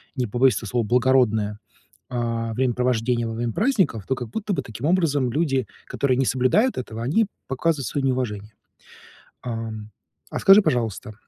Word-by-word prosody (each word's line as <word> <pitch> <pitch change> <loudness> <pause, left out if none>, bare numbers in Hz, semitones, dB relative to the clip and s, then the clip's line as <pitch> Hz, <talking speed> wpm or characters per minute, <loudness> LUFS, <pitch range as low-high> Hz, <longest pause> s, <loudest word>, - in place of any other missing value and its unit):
не 125 -3 -1
побоюсь 125 +4 +3
этого 115 - -5
слова, 120 +1 0
благородное, 115 -4 +2 0.5
а, 115 -2 -2
времяпровождение 125 -1 0
во 115 - -4
время 115 0 -2
праздников, 200 - +1
то 130 - +1
как 120 -3 -6
будто 205 - -3
бы, - - -1
таким 115 +4 -7
образом, 150 -8 +2
люди, 135 -4 0 0.2
которые 130 -3 0
не 135 - +2
соблюдают 160 - +2
этого, 115 -2 -5
они 170 - +2 0.2
показывают 135 -1 -1
свое 140 -2 -2
неуважение. 110 -5 -2 0.9
Ам. 110 -3 -6 0.4
А - - -4
скажи, 195 +2 +7
пожалуйста, 115 - -2
125 Hz, 155 wpm, -23 LUFS, 115-135 Hz, 0.9 s, скажи